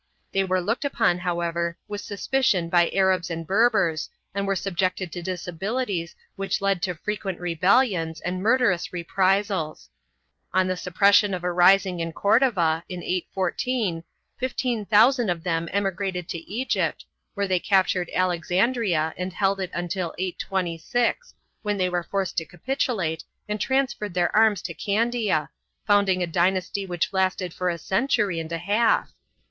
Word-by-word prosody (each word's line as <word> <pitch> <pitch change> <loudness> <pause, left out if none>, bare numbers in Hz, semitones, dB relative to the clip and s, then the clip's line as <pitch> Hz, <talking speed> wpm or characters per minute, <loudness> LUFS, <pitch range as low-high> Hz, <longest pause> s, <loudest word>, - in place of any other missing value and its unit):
They 195 - +2
were 185 -1 +1
looked 220 +10 -1
upon, 180 -10 +1
however, 170 -1 -2
with 205 0 -5
suspicion 205 -4 0
by 175 0 +4
Arabs 190 -2 +2
and 165 -1 -4
Berbers 195 -5 +2 0.2
and 200 0 -2
were 195 - +1
subjected 185 -1 -1
to 175 - -5
disabilities 185 +2 -3 0.2
which 195 0 -2
led 195 -3 0
to 180 0 -1
frequent 195 +1 -4
rebellions 175 -1 +2
and 180 +2 -3
murderous 225 -5 +2
reprisals. 190 -1 0 0.6
On 185 0 +4
the 185 0 -1
suppression 200 +3 +3
of 180 - -7
a 180 - 0
rising 180 +1 +4
in 165 0 -3
Cordova, 195 -7 +2
in 180 -1 -6
814, 185 +1 -1 0.4
fifteen 245 -4 -2
thousand 230 +2 +5
of 170 -2 -2
them 165 -1 -1
emigrated 190 -2 -2
to 165 0 -6
Egypt, 250 +5 -1 0.3
where 200 -1 0
they 185 -1 +2
captured 185 -2 +2
Alexandria 180 -1 +1
and 180 +1 -3
held 195 +1 +1
it 185 -2 -3
until 175 -1 -3
826, 190 - -2 0.3
when 205 -1 -1
they 185 -1 +1
were 175 -1 0
forced 190 0 -3
to 165 - 0
capitulate 185 - -2 0.2
and 210 -1 -3
transferred 265 -8 0
their 175 -1 +1
arms 215 -4 +4
to 170 - -4
Candiar 215 -3 0 0.4
founding 200 -3 +3
a - - +1
dynasty 185 +3 0
which 175 0 -2
lasted 185 -2 0
for 180 0 -1
a 170 - -2
century 200 - 0
and 165 0 -6
a 165 - -1
half. 205 +7 +1
185 Hz, 150 wpm, -24 LUFS, 175-205 Hz, 0.6 s, thousand